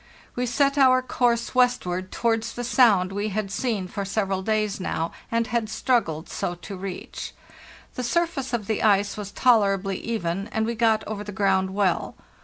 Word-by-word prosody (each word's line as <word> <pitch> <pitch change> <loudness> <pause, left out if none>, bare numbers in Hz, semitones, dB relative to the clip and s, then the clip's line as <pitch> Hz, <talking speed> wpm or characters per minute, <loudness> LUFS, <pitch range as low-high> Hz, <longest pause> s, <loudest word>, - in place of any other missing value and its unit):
We 250 0 -1
set 275 +4 +2
our 255 -1 +5
course 240 -2 0
westward 185 -8 +1
towards 225 -1 0
the 245 - -5
sound 220 -7 +4
we 205 +2 -2
had 205 -1 -3
seen 215 -5 -1
for 200 +2 -4
several 195 -1 -1
days 215 0 0
now, 165 -3 -2 0.2
and 230 0 +1
had 225 -1 -1
struggled 215 -9 0
so 175 - -3
to 185 +3 -8
reach. 190 -1 -6 0.6
The - - -4
surface 275 0 -1
of 235 -4 -2
the 220 +1 -1
ice 200 -1 +3
was 210 -2 -6
tolerably 195 -5 +2
even 195 -4 -3
and 220 -1 -1
we 230 - -1
got 220 -1 +2
over 210 -1 -5
the 205 - -7
ground 190 -1 +1
well. 195 -4 0
215 Hz, 175 wpm, -25 LUFS, 195-235 Hz, 0.6 s, our